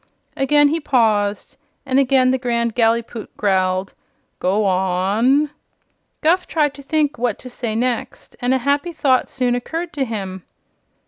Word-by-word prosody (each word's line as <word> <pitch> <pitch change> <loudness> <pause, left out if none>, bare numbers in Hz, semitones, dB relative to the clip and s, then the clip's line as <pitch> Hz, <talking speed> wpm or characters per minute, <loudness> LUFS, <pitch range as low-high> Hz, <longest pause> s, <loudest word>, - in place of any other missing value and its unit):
Again 290 +2 +4
he 325 +3 0
paused, 215 -8 0 0.3
and 265 0 +2
again 260 -1 +3
the 260 - 0
Grand 235 -2 -1
Gallipoot 230 -1 0
growled: 190 -1 0 0.5
"Go 200 +3 +1
on!" 195 +10 +2 0.7
Guph 350 +4 +2
tried 295 -3 +1
to 285 - -11
think 295 -1 0
what 240 -3 0
to 250 - -11
say 235 -3 -4
next, 240 0 -3
and 245 +1 +1
a 265 - +4
happy 285 +5 0
thought 265 -4 +2
soon 250 -2 0
occurred 325 +8 -4
to 280 - -1
him. 195 -6 -5
245 Hz, 145 wpm, -20 LUFS, 215-280 Hz, 0.7 s, Again